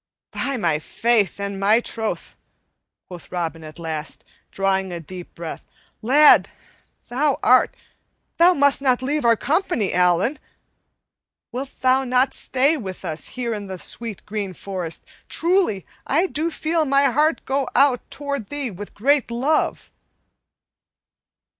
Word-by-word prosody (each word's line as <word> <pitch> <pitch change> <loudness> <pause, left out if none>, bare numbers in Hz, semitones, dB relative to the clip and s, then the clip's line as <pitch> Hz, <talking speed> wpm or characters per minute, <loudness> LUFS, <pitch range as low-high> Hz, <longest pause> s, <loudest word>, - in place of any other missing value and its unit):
"By 275 -1 -2
my 165 -8 +1
faith 220 +3 +1
and 200 -1 -4
my 210 +3 +4
troth," 225 -2 -4 0.7
quoth 175 -6 -11
Robin 165 -2 -3
at 155 -1 -10
last, 160 -3 -5 0.2
drawing 195 -1 0
a 175 - -4
deep 180 +2 -10
breath, 170 -1 -7 0.4
"lad, 285 +7 +6 0.6
thou 270 +3 +1
art 255 +1 +4 0.6
Thou 355 +2 +6
must 285 -1 +3
not 255 -2 +2
leave 290 +3 0
our 230 -1 +6
company, 320 - 0
Allan! 180 - +2 1.1
Wilt 260 +3 -6
thou 260 +1 +4
not 255 +1 +2
stay 275 +5 +1
with 190 -6 -7
us 160 -2 -2
here 240 -2 -1
in 205 -2 -5
the 190 -1 -6
sweet 225 +2 -4
green 205 -3 -4
forest? 180 -4 -5 0.2
Truly, 340 - +1 0.2
I 320 +7 +3
do 325 -2 -2
feel 320 0 0
my 275 -1 +3
heart 305 +5 +1
go 270 -1 0
out 265 -2 +4
toward 280 -6 -4
thee 285 -4 -3
with 200 +2 -9
great 275 +5 +2
love." 265 +7 0
240 Hz, 135 wpm, -22 LUFS, 190-280 Hz, 1.1 s, lad